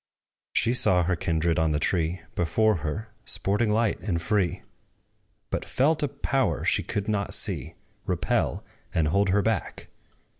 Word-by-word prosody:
She 115 - +3
saw 90 -7 +4
her 90 +1 +1
kindred 85 0 0
on 80 -1 +2
the 75 - +1
tree 85 +1 0
Before 90 +5 +2
her, 95 +8 -5
sporting 105 +3 0
light 110 0 +1
and 90 -2 -2
free; 90 +2 0 0.9
But - - -1
felt 155 +4 +1
a 145 - +1
power, 135 -1 -1
she - - +3
could 105 0 -3
not 105 -2 0
see, 80 - 0 0.3
Repel - - 0 0.3
and 75 -2 +2
hold 100 +4 +2
her 100 +2 +2
back. 110 -7 -2
95 Hz, 150 wpm, -26 LUFS, 85-110 Hz, 0.9 s, saw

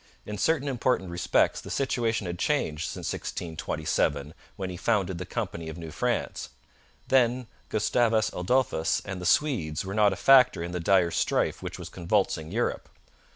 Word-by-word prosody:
In 105 -1 -6
certain 155 0 +1
important 120 -8 0
respects 85 0 +1
the - - -10
situation 115 -6 0
had 85 0 -5
changed 85 - 0
since - - -4
1627, 80 -2 -2 0.2
when 95 -1 -4
he - - -6
founded 95 -3 0
the 90 - -6
Company 95 -9 -4
of 80 - -7
New 80 -2 -7
France. - - -2 0.6
Then 125 -1 +3 0.2
Gustavus 110 0 +2
Adolphus 90 -3 +1
and 95 -2 -5
the 90 - -1
Swedes 90 - +1
were 95 - -4
not 105 -1 +4
a - - -2
factor 130 -9 +5
in 85 - -5
the 90 - -3
dire 90 -1 +3
strife - - 0
which - - -6
was - - -8
convulsing 85 -3 -1
Europe. 120 +4 -2
95 Hz, 160 wpm, -27 LUFS, 85-120 Hz, 0.6 s, factor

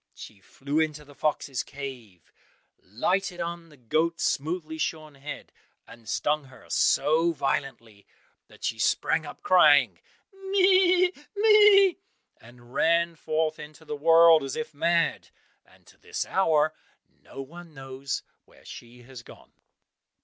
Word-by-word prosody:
She 100 -3 -13
flew 140 +8 -4
into 155 -1 -2
the 145 - -16
fox's 140 -3 -2
cave, 125 - -10 0.5
lighted 180 - -2
on 170 0 -6
the 150 - -19
goat's 160 +7 -1
smoothly 160 +1 -2
shorn 155 -1 -4
head, 140 +2 -9 0.3
and 115 -1 -14
stung 150 -1 -1
her 130 -1 -17
so 165 +3 +2
violently, 120 -8 -4 0.4
that - - -19
she - - -2
sprang - - 0
up, - - -12
crying 145 - +4 0.3
"Meh, 375 -2 +3 0.3
meh," 415 -3 +6 0.4
and 120 +1 -18
ran 170 +1 +2
forth 155 0 -2
into 150 +2 -12
the 150 - -5
world 165 +1 +6
as 135 -1 -5
if 235 -5 -5
mad, 165 +2 0 0.4
and - - -25
to - - -21
this - - -5
hour 155 -5 +1 0.5
no - - -13
one 170 +4 -13
knows 135 0 -6 0.2
where - - -23
she 120 +1 -12
has 125 -1 -12
gone.) - - -17
155 Hz, 135 wpm, -26 LUFS, 135-170 Hz, 0.5 s, meh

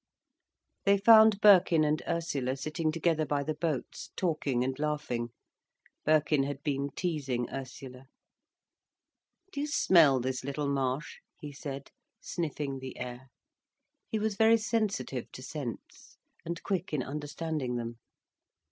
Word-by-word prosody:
They 200 0 +4
found 220 0 +7
Birkin 180 -6 +6
and 150 +1 +1
Ursula 140 -6 -1
sitting 155 +3 -1
together 165 -1 +1
by 145 -1 -1
the 155 - -2
boats, 155 -5 -3
talking 150 -8 0
and 130 +1 -3
laughing. 150 -6 -2 0.8
Birkin 155 -1 +3
had 140 +1 -4
been 140 -2 -1
teasing 135 -9 -2
Ursula. 130 -1 -8 1.5
"Do - - -4
you 295 - -1
smell 165 - +5
this 130 +1 -2
little 140 +2 -2
marsh?" 135 +1 -2 0.2
he 150 - -7
said, 140 -1 -7 0.3
sniffing 145 -5 -3
the 130 -1 -8
air. 125 +1 -7 0.8
He 220 - -1
was 215 -1 -1
very 225 +1 +6
sensitive 220 -2 -2
to - - -9
scents, - - -7 0.3
and 170 0 -5
quick 185 -4 -2
in 140 -4 0
understanding 145 -2 -3
them. 115 -1 -5
150 Hz, 130 wpm, -30 LUFS, 135-170 Hz, 1.5 s, found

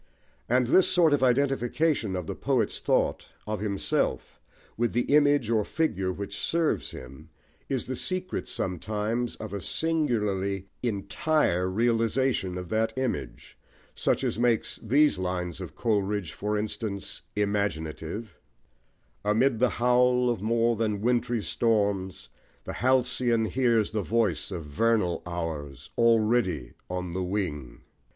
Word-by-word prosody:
And 125 +1 +3
this 180 +9 +5
sort 170 -4 +4
of 145 - +2
identification 130 -2 +1
of 90 -2 -3
the - - -4
poet's - - 0
thought, - - 0 0.2
of 105 -1 -3
himself, 100 -1 -1 0.3
with 120 0 0
the 120 +2 +2
image 145 -4 +4
or 110 -2 +3
figure 100 - -1
which 100 +2 -6
serves 165 -1 0
him, 70 +5 -11 0.4
is 130 -3 -1
the 130 - -3
secret, 185 +7 -1
sometimes, 105 +6 -2
of 110 -2 -7
a 100 - -3
singularly 105 - 0 0.2
entire 100 - 0
realisation 115 -1 +1
of 90 -2 -6
that 110 +3 0
image, 65 - -4 0.3
such - - 0
as - - -1
makes 120 -2 +1
these 140 +1 +3
lines 90 -1 -3
of 90 - -8
Coleridge, 105 -5 0
for 105 +1 -2
instance, 105 -1 -4
"imaginative" 100 -1 -2 0.8
Amid 115 +4 +2
the 125 0 +4
howl 125 0 +3
of 115 -5 -3
more 115 +2 +2
than 105 -2 -1
wintry 120 -1 +1
storms, 100 -5 0 0.4
The - - -6
halcyon 125 -2 +2
hears 115 -2 +2
the 110 - -1
voice 105 -6 0
of 85 -5 -5
vernal 90 +2 +1
hours 80 -5 -5
Already 115 - +2 0.2
on 90 -1 -3
the 95 +2 -2
wing. 90 -9 -3
110 Hz, 130 wpm, -27 LUFS, 95-125 Hz, 0.8 s, this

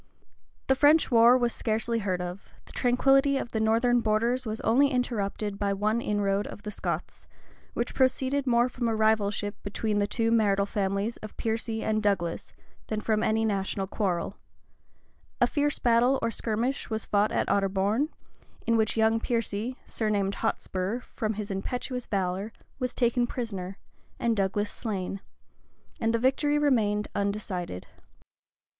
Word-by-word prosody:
The 265 - +4
French 295 +3 +4
war 235 +1 +7
was 240 -2 0
scarcely 230 +1 -1
heard 185 -4 -1
of; 180 +2 -7 0.2
the - - -15
tranquillity 270 +3 +3
of 245 - -4
the 220 - -1
northern 230 +3 +3
borders 230 +3 +1
was 215 +1 -3
only 255 +6 +4
interrupted 215 -6 -2
by 200 -1 +1
one 215 +4 0
inroad 205 -2 0
of 205 - -10
the 210 - -5
Scots, 175 -4 -5 0.5
which 235 - -2
proceeded 265 +1 +1
more 240 0 +4
from 245 -1 -3
a 225 - +1
rivalship 210 -1 +1
between 205 +1 -1
the 205 - +1
two 225 +2 0
martial 200 -3 +3
families 200 +2 -1
of 215 - -10
Piercy 225 0 -2
and 215 0 0
Douglas, 190 -5 -1 0.4
than 215 - -2
from 215 0 0
any 220 +1 +1
national 195 -2 -1
quarrel: 190 -1 -2 1.0
a - - +6
fierce 290 -1 0
battle 240 +3 +3
or 230 - +1
skirmish 230 +5 -2
was 220 -1 -2
fought 205 +1 +2
at - - 0
Otterborne,[] 200 +8 +1 0.6
in 230 0 +3
which 220 0 +1
young 220 0 +3
Piercy, 230 +1 -2
surnamed 205 -3 -1
Hotspur, 190 +6 -2
from 220 -3 -4
his 210 0 -5
impetuous 250 +5 -3
valor, 195 +2 -1 0.3
was 250 -1 -2
taken 240 0 +2
prisoner, 195 -7 -5 0.4
and 235 -1 +1
Douglas 205 +1 0
slain; 195 -3 -4 0.8
and 225 - +1
the 230 - +2
victory 270 +4 +2
remained 220 -8 +2
undecided. 200 - -3
220 Hz, 150 wpm, -28 LUFS, 200-240 Hz, 1.0 s, war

